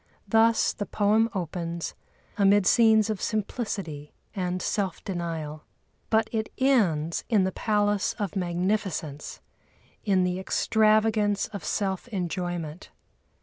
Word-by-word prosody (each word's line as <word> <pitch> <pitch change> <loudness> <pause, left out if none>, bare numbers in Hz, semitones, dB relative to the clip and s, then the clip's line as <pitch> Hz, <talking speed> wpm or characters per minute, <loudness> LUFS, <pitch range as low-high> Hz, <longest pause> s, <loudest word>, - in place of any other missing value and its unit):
Thus 225 0 +3
the 205 - -5
poem 215 +2 +2
opens, 170 -1 -4 0.4
amid 200 -1 +4
scenes 220 -1 +5
of 210 - -4
simplicity 195 -9 -3 0.2
and 180 -2 -2
self 190 -2 -2
denial. 165 -5 -4 0.5
But 220 0 +3
it 220 -1 -2
ends 180 - +2
in 215 -5 +4
the 190 - 0
palace 205 0 +1
of 205 -1 -3
magnificence, 180 -4 -2 0.6
in 190 -3 +2
the 180 0 -1
extravagance 215 0 +2
of 200 -6 -7
self 190 +1 -2
enjoyment. 175 -5 -4
195 Hz, 110 wpm, -26 LUFS, 175-215 Hz, 0.6 s, scenes